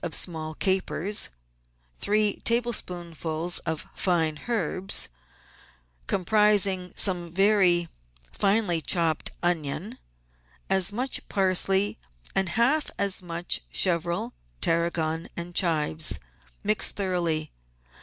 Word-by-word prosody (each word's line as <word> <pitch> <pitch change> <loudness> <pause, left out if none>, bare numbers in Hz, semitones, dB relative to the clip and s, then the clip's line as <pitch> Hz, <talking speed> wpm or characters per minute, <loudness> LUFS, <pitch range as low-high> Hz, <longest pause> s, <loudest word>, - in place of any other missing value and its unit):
of 170 -3 -1
small 155 -3 0
capers, 190 +2 0 0.7
three 210 0 +1
table 235 +1 +1
spoonfuls 170 -3 -1
of 160 -1 -2
fine 160 -4 +1
herbs, 195 -4 0 1.0
comprising 195 -1 +3
soine 175 -3 +1
very 185 -2 +3 0.5
finely 195 -5 +1
chopped 160 +1 0
onion, 160 -5 -2 0.7
as 190 0 +4
much 250 +5 -1
parsley, 195 0 +2 0.3
and 190 -2 +1
half 275 +6 +2
as 200 -1 +2
much 170 -1 -2
chervil, 170 -1 +1 0.3
tarragon, 165 - 0
and 170 +1 -5
chives. 160 -3 +1 0.5
Mix 210 0 +2
thoroughly. 170 -6 -1
180 Hz, 95 wpm, -26 LUFS, 165-200 Hz, 1.0 s, as